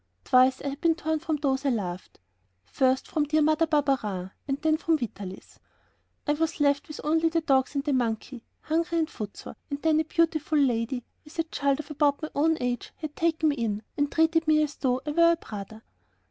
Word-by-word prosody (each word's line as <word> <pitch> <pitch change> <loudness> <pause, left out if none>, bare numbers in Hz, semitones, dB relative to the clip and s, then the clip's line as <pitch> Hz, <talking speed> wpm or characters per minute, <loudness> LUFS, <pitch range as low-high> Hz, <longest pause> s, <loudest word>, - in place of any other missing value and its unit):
Twice 255 - +4
I 285 - -1
had 280 +1 -7
been 330 -1 +3
torn 315 -1 -1
from 320 0 -1
those 275 -2 0
I 280 - +2
loved,... 185 -7 -4 0.5
first 260 0 +1
from 300 -2 0
dear 305 +1 +2
Mother 310 +2 +3
Barberin, 255 - 0 0.2
and 275 0 -1
then 315 -1 +4
from 325 0 +1
Vitalis. 200 -7 -7 0.7
I 295 - +2
was 320 +2 -1
left 285 0 +2
with 305 - -8
only 325 +2 +2
the 330 0 0
dogs 270 -2 +1
and 280 - 0
the 290 -1 0
monkey, 240 0 -2 0.2
hungry 335 +2 0
and 320 -1 +1
footsore, 210 -9 -8
and 285 - -3
then 315 -1 +3
a - - +2
beautiful 315 -1 +1
lady, 245 -2 +1 0.2
with 300 +2 -15
a 330 - +2
child 280 -3 0
of 300 0 -13
about 290 -1 +2
my 310 - -4
own 315 +2 +2
age, 245 -1 -2
had 310 -2 -7
taken 320 -1 +1
me 290 - -1
in 215 -3 -2
and 290 -1 0
treated 325 0 +2
me 305 0 +4
as 295 -1 -3
though 255 -1 0
I 300 - -2
were 335 +2 +5
a - - 0
brother. 220 - -9
290 Hz, 210 wpm, -27 LUFS, 255-315 Hz, 0.7 s, were